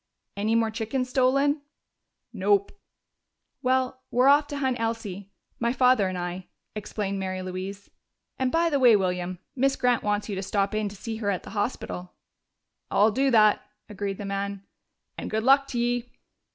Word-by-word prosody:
"Any 215 +3 0
more 225 -1 +2
chickens 235 +4 -2
stolen?" 275 +3 +3 0.7
"Nope." 200 -1 +2 0.9
"Well, 260 0 0
we're 250 +3 +4
off 290 +1 +5
to 290 - -5
hunt 260 -3 0
Elsie 215 -4 -3 0.3
my 235 0 +1
father 250 -5 +4
and 185 0 -3
I," 175 +1 -5 0.3
explained 205 -2 -3
Mary 185 -1 -3
Louise. 185 +2 -6 0.5
"And, 260 -1 +1
by 335 0 +2
the 285 - +2
way, 245 -4 +7
William, 180 -2 -1 0.2
Miss 270 +1 +2
Grant 245 -2 +2
wants 205 0 -1
you 210 - -4
to 190 - -3
stop 200 +1 0
in 215 -1 0
to 200 - -11
see 220 +3 -5
her 210 -2 -2
at 190 -3 -1
the - - -10
hospital." 205 -4 -4 0.7
"I'll 210 +2 +4
do 270 +5 +2
that," 215 -4 +5 0.3
agreed 200 -1 -4
the 205 - -6
man. 200 0 -3 0.6
"And - - -5
good 220 0 -1
luck 275 +2 +5
to 245 - -4
ye!" 240 0 0
215 Hz, 170 wpm, -26 LUFS, 200-255 Hz, 0.9 s, way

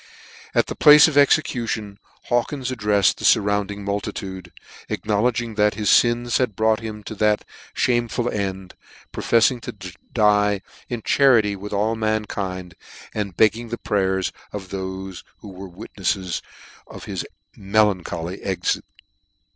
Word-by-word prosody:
At - - +4
the - - -6
place 150 -1 +8
of 155 - -3
execution 115 -8 +1 0.2
Hawkins 125 +2 -1
addrefled 105 -6 +2
the - - -10
furrounding 100 0 +2
multitude, 95 -2 -4 0.4
acknowledging 115 +2 0
that 105 -1 +2
his 105 -2 +4
fins 120 0 +2
had 125 -6 0
brought 110 +1 +2
him 110 -2 -7
to 110 - -7
that 105 0 +1 0.3
lhameful 120 -1 0
end, 95 -2 -4 0.4
profefiing 120 +1 +2
to 95 -5 -8 0.2
die 105 -2 +3 0.3
in 120 -3 -4
charity 115 -7 +4
with 100 +2 -8
all 105 +2 0
mankind, 100 -5 -3 0.4
and 100 -5 -4
begging 110 +2 +2
the 120 - -4
prayers 95 -3 0 0.2
of 95 -3 -7
thofe 95 -1 -6 0.2
who 105 - -10
were 95 0 -9
witnefles 95 0 -3 0.5
of - - -11
his - - -4 0.3
melancholy 95 -4 0
exit. 95 -2 -1
105 Hz, 130 wpm, -22 LUFS, 95-115 Hz, 0.5 s, place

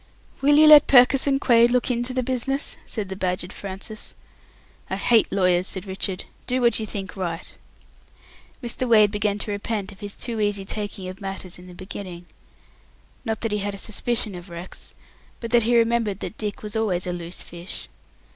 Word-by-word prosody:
"Will 290 +1 +5
you 310 - +8
let 300 -1 +9
Purkiss 260 +1 +6
and 275 -1 +3
Quaid 235 -3 +5
look 250 +1 +1
into 240 +1 -1
the 255 0 -1
business?" 260 +2 -1
said 215 -4 -3
the 190 - -6
badgered 180 0 -2
Francis. 200 +3 -7 0.7
"I - - -1
hate 220 +3 +3
lawyers," 180 -1 +2
said 190 0 -2
Richard. 190 -1 -4 0.2
"Do 255 +1 +1
what 235 -3 +3
you 215 - -4
think 195 -3 -4
right." 175 -3 -5 1.1
Mr. 240 +1 -2
Wade 215 -3 +6
began 210 -1 0
to 210 - -3
repent 205 0 -3
of 195 - -15
his 205 -2 -6
too 230 -3 -3
easy 205 -2 0
taking 205 -2 -5
of 185 +2 -8
matters 195 -2 -6
in 180 - -13
the 180 - -12
beginning. 185 -1 -8 1.0
Not 220 -3 -3
that 225 - -2
he 210 - 0
had 200 0 -3
a - - -8
suspicion 220 +1 +1
of 180 +1 -9
Rex, 170 +1 -10 0.4
but 230 -1 -6
that 240 0 +5
he 235 +2 +1
had - - +6
remembered 230 -4 +1
that - - -5
Dick 210 -1 -4
was 210 +1 -6
always 195 -5 0
a 180 - -2
loose 175 0 -5
fish. 175 +1 -8
210 Hz, 195 wpm, -24 LUFS, 190-235 Hz, 1.1 s, let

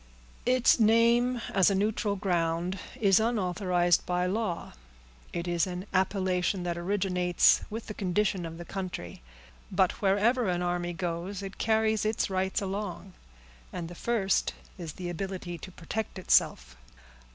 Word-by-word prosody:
"Its 255 0 +4
name, 235 +3 +4
as 190 0 +5
a 195 - +1
neutral 205 +1 0
ground, 175 -1 -1 0.2
is 195 -2 +5
unauthorized 180 -5 +1
by 180 0 0
law; 190 -2 -2 0.6
it 170 +1 -4
is 175 +1 +1
an 180 +1 -5
appellation 185 -1 +1
that 175 -1 -2
originates 180 -1 +2
with 225 +2 -5
the 215 - -6
condition 195 -1 0
of 165 0 -6
the 175 - -8
country. 180 - -6 0.5
But 190 +3 +1
wherever 210 +4 +3
an 175 0 0
army 175 0 -1
goes, 180 +3 -4
it 195 0 -8
carries 220 -1 +2
its 215 -2 0
rights 190 +1 0
along, 195 -1 -5 0.6
and 165 -1 -5
the - - -8
first 200 0 0 0.2
is 170 -5 -7
the 180 - -6
ability 175 -1 -5
to 185 - -9
protect 200 +5 -5
itself." 60 - +2
190 Hz, 140 wpm, -29 LUFS, 175-210 Hz, 0.6 s, as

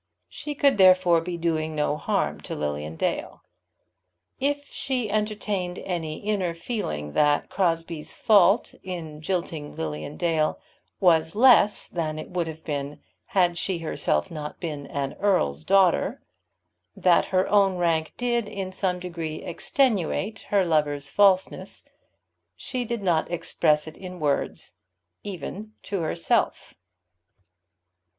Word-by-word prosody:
She 295 - -6
could 280 -6 +3
therefore 185 -3 +6
be 175 +1 -4
doing 160 -2 -1
no 150 0 +1
harm - - -1
to - - -6
Lilian 75 +1 -3
Dale. - - -3 1.0
If 285 +1 0
she 250 -7 -2
entertained 210 -4 -2
any 165 -4 -4
inner 195 -5 -1
feeling 75 - -4
that 145 -1 +2
Crosbie's 165 -4 -1
fault 205 0 +4
in 160 -5 -7
jilting 165 -4 -3
Lilian 75 - -5
Dale 160 -3 +1 0.4
was 165 -3 +3
less 220 -3 +5
than 155 -3 -3
it 155 - -7
would 175 -2 -1
have 160 0 -8
been 145 0 -4 0.3
had 180 -6 +2
she 190 -3 -1
herself 155 - -1
not 150 -2 -6
been 150 -4 -5
an 140 -1 -3
earl's 180 - +1
daughter, 190 -2 +3 0.8
that 180 -2 +4
her 185 0 +1
own 195 -3 +3
rank 165 -2 +1
did 240 -3 0
in 195 -3 -5
some 185 -1 -1
degree 165 -3 -5
extenuate 210 - 0
her 200 -2 +3
lover's 145 -4 0
falseness, 195 -2 +2 0.7
she 255 -2 -3
did 235 -2 -3
not 170 -4 +1
express 155 -3 +1
it 155 -1 -10
in 180 -1 -8
words 145 -2 -1 0.4
even 205 +2 -7
to 195 -3 -3
herself. 165 +1 0
175 Hz, 130 wpm, -25 LUFS, 155-200 Hz, 1.0 s, therefore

